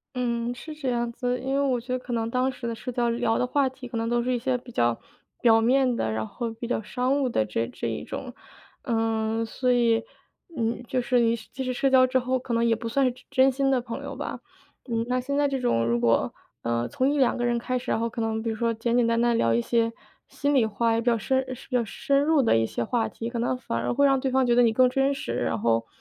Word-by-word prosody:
嗯， 240 Hz, -1 st, -1 dB
是 305 Hz, +5 st, -9 dB
这 275 Hz, -4 st, -2 dB
样 235 Hz, -1 st, -1 dB
子， 250 Hz, +1 st, -2 dB
因 265 Hz, +2 st, -2 dB
为 280 Hz, -, +2 dB
我 260 Hz, -4 st, +1 dB
觉 250 Hz, +2 st, -8 dB
得 255 Hz, -, +1 dB
可 250 Hz, -1 st, -6 dB
能 225 Hz, -1 st, -1 dB
当 255 Hz, +2 st, +1 dB
时 250 Hz, -2 st, -7 dB
的 230 Hz, -, -3 dB
社 250 Hz, +3 st, -6 dB
交 240 Hz, -1 st, 0 dB
聊 235 Hz, -1 st, 0 dB
的 250 Hz, -, +1 dB
话 280 Hz, +1 st, +2 dB
题， 260 Hz, -1 st, -8 dB
可 240 Hz, -, -5 dB
能 225 Hz, -, -1 dB
都 240 Hz, 0 st, +1 dB
是 250 Hz, -, -1 dB
一 245 Hz, -, +1 dB
些 255 Hz, +2 st, 0 dB
比 245 Hz, 0 st, -13 dB
较 120 Hz, -, +1 dB, 0.4 s
表 225 Hz, -2 st, +6 dB
面 255 Hz, +2 st, +3 dB
的， 110 Hz, -, -1 dB
然 110 Hz, 0 st, -2 dB
后 235 Hz, -, -4 dB
比 230 Hz, +1 st, -7 dB
较 245 Hz, -, 0 dB
商 255 Hz, +5 st, 0 dB
务 270 Hz, -, +1 dB
的 170 Hz, -, +1 dB
这 115 Hz, +2 st, -1 dB
这 -, -, -5 dB
一 -, -, -4 dB
种。 -, -, -7 dB, 0.5 s
嗯， 225 Hz, -1 st, 0 dB
所 250 Hz, +3 st, -1 dB
以， 230 Hz, -2 st, +3 dB, 0.5 s
嗯， 235 Hz, -1 st, -1 dB
就 255 Hz, -, 0 dB
是 245 Hz, 0 st, +2 dB
你 230 Hz, 0 st, +3 dB
是 220 Hz, -, -11 dB
即 265 Hz, -, -4 dB
使 255 Hz, -1 st, -2 dB
社 270 Hz, +2 st, +1 dB
交 260 Hz, -1 st, +6 dB
之 255 Hz, 0 st, +1 dB
后， 255 Hz, +1 st, 0 dB
可 255 Hz, -1 st, -5 dB
能 230 Hz, 0 st, +2 dB
也 230 Hz, -1 st, +3 dB
不 230 Hz, +1 st, -6 dB
算 275 Hz, +4 st, +1 dB
是 250 Hz, -, +1 dB
真 250 Hz, -, -16 dB
真 265 Hz, -1 st, +5 dB
心 270 Hz, +1 st, +1 dB
的 255 Hz, -, +2 dB
朋 235 Hz, -1 st, -6 dB
友 -, -, -6 dB
吧。 -, -, -5 dB, 0.5 s
嗯， 230 Hz, -1 st, -1 dB
那 255 Hz, -, +1 dB
现 280 Hz, +3 st, -3 dB
在 290 Hz, 0 st, +3 dB
这 270 Hz, -1 st, -2 dB
种 240 Hz, -, +1 dB
如 120 Hz, +1 st, +1 dB
果， 115 Hz, -1 st, +2 dB, 0.3 s
呃， 115 Hz, 0 st, -1 dB
从 260 Hz, +2 st, 0 dB
1-2 275 Hz, -4 st, +2 dB
个 240 Hz, -, -2 dB
人 240 Hz, 0 st, +1 dB
开 250 Hz, +2 st, -2 dB
始， -, -, -8 dB
然 -, -, +1 dB
后 230 Hz, -, 0 dB
可 230 Hz, 0 st, -5 dB
能 220 Hz, 0 st, -1 dB
比 230 Hz, -, -1 dB
如 -, -, -3 dB
说 230 Hz, +1 st, 0 dB
简 230 Hz, +1 st, -1 dB
简 245 Hz, -1 st, +3 dB
单 230 Hz, 0 st, +2 dB
单 235 Hz, 0 st, +3 dB
聊 115 Hz, -, +2 dB
一 120 Hz, -, +3 dB
些 230 Hz, -, +1 dB, 0.4 s
心 285 Hz, 0 st, -1 dB
里 265 Hz, -4 st, +4 dB
话 225 Hz, +2 st, +1 dB
也 225 Hz, -, +1 dB
比 -, -, -9 dB
较 235 Hz, -1 st, +4 dB
深 260 Hz, +5 st, +1 dB
呃， 260 Hz, -1 st, -6 dB
比 255 Hz, -, -6 dB
较 245 Hz, -, +3 dB
深 275 Hz, +6 st, 0 dB
入 305 Hz, -2 st, +3 dB
的 230 Hz, -, +3 dB
一 115 Hz, 0 st, +2 dB
些 120 Hz, -, -3 dB
话 230 Hz, -, 0 dB
题， 230 Hz, +1 st, -6 dB
可 235 Hz, -, -3 dB
能 245 Hz, +2 st, 0 dB
反 115 Hz, -, -3 dB
而 120 Hz, +1 st, -1 dB
会 285 Hz, -, +3 dB
让 270 Hz, -1 st, +4 dB
对 265 Hz, -, -1 dB
方 260 Hz, 0 st, +2 dB
觉 240 Hz, -, +3 dB
得 245 Hz, -, +5 dB
你 230 Hz, -2 st, +4 dB
更 255 Hz, +3 st, +4 dB
真 270 Hz, +1 st, +2 dB
实， 270 Hz, -, -4 dB
然 115 Hz, -2 st, -1 dB
后， 115 Hz, 0 st, +1 dB
240 Hz, 300 characters per minute, -26 LUFS, 225-255 Hz, 0.5 s, 表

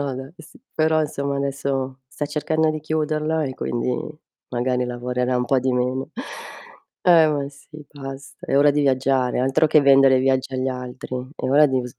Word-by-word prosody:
No 140 Hz, -2 st, -2 dB
dai, 135 Hz, +5 st, -8 dB
sì; -, -, -15 dB
però 155 Hz, 0 st, +2 dB
insomma 140 Hz, -2 st, -2 dB
adesso 135 Hz, -1 st, -2 dB
sta 150 Hz, +1 st, -4 dB
cercando 155 Hz, +1 st, 0 dB
di 155 Hz, -, -4 dB
chiuderla 155 Hz, 0 st, -1 dB
e 130 Hz, -2 st, -4 dB
quindi 120 Hz, +1 st, -2 dB, 0.5 s
magari 125 Hz, 0 st, 0 dB
lavorerà 125 Hz, +1 st, -2 dB
un 125 Hz, -, 0 dB
po' 135 Hz, +2 st, +2 dB
di 130 Hz, 0 st, 0 dB
meno. 125 Hz, +2 st, -1 dB, 0.9 s
Eh, 165 Hz, -3 st, +6 dB
ma 145 Hz, -2 st, -1 dB
sì, 140 Hz, 0 st, -18 dB, 0.2 s
basta, 135 Hz, -1 st, -9 dB
è 135 Hz, -, +1 dB
ora 145 Hz, +1 st, +6 dB
di 145 Hz, -, +1 dB
viaggiare 130 Hz, -2 st, +1 dB
altro 135 Hz, +4 st, +3 dB
che 155 Hz, -, +5 dB
vendere 135 Hz, -1 st, +6 dB
viaggi 130 Hz, 0 st, 0 dB
agli 130 Hz, +1 st, -1 dB
altri. 125 Hz, 0 st, -6 dB, 0.2 s
È 130 Hz, -, -3 dB
ora 150 Hz, +3 st, +6 dB
di 130 Hz, -2 st, 0 dB
v -, -, -6 dB
s 125 Hz, 0 st, -13 dB
135 Hz, 185 wpm, -22 LUFS, 130-150 Hz, 0.9 s, Eh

